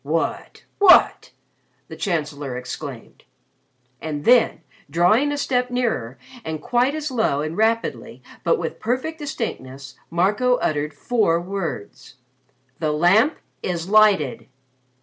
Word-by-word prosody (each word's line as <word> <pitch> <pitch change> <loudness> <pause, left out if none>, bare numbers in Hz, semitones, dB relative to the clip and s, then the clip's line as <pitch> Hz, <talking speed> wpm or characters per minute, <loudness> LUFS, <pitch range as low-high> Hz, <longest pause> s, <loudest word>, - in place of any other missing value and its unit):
"What! 160 +3 -3 0.2
What!" 400 -3 +5 0.6
the - - -9
Chancellor 150 - -3
exclaimed. 125 - -8 0.8
And 150 -2 -5
then, 245 0 +4 0.3
drawing 180 - +3
a 290 - -2
step 250 -3 0
nearer 225 - -2 0.3
and 160 -1 -4
quite 245 - +1
as 305 -2 -4
low 220 - +1
and 155 +2 -4
rapidly 225 +2 -1 0.2
but 485 - +2
with - - -5
perfect 260 +8 -2
distinctness, 135 - -6 0.2
Marco 205 +9 +2
uttered 150 -8 -2
four 190 -1 +1
words: 175 - -6 0.6
"The 155 -2 0
Lamp 195 - +3 0.2
is 175 -1 -3
lighted." 205 - +3
190 Hz, 115 wpm, -22 LUFS, 150-245 Hz, 0.8 s, What